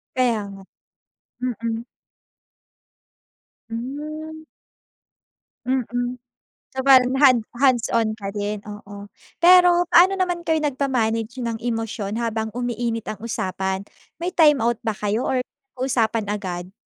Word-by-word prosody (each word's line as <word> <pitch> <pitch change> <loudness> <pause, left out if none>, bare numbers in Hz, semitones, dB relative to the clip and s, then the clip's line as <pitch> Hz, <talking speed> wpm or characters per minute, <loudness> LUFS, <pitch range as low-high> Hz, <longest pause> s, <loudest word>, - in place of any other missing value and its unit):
Kaya 245 -4 +2
nga. 195 0 -11 0.8
Mm. 230 -2 -3 1.9
Hmm. 305 +6 -6 1.2
Mm. 245 -1 -2 0.5
So 265 - -10
bale 260 -2 +8
hand 255 -5 +6 0.2
hands-on 235 -4 +2
ka 200 -2 -6
din 205 0 -3
oo. 205 -1 -10 0.3
Pero 355 0 +7
paano 370 +3 +6
naman 355 -2 -1
kayo 320 -1 +2
nag-ma-manage 250 -4 -1
ng 230 -1 -2
emosyon 225 -3 -3
habang 220 -1 -1
umiinit 240 -2 -2
ang 215 - -6
usapan, 190 -4 -2 0.4
may 355 - 0
timeout 280 -9 +4
ba 225 -3 -2
kayo 210 +4 -1
or 255 -1 +1 0.3
usapan 230 -4 0
agad? 185 -3 -5
235 Hz, 105 wpm, -22 LUFS, 220-265 Hz, 1.9 s, bale